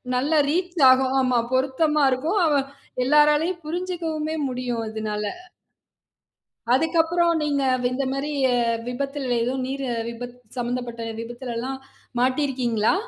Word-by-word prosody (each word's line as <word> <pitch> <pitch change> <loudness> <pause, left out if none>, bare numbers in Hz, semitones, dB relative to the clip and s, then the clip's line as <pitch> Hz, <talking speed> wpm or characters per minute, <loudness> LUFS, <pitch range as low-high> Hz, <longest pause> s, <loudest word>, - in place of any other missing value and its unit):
நல்லா 295 +5 +2
ரீச் 350 +1 -1
ஆகும். 260 0 +4
ஆமா 255 -1 +2 0.2
பொருத்தமா 280 +3 +2
இருக்கும். 310 +11 0
அவ 305 - +3 0.5
எல்லோராலும் 300 +5 +4
புரிஞ்சுக்கவுமே 325 -2 -3
முடியும். 250 -2 -3
அதுனால. 215 -1 -3 1.5
அதுக்கப்பறம் 330 +2 +2
நீங்க 285 -2 0 0.3
இந்தமாரி 275 +3 -2 0.2
அ - - +2 0.3
விபத்தில் 275 +2 -3 0.2
ஏதோ 250 +2 -1
நீர் 275 +1 -3 0.3
விபத்து 245 +1 -8 0.2
சம்பந்தப்பட்ட 240 -1 -3
விபத்திலல்லாம் 240 +2 -5 0.4
மாட்டி 260 +3 +2
இருக்கீங்களா? 240 -2 +1
270 Hz, 105 wpm, -24 LUFS, 245-310 Hz, 1.5 s, ஆகும்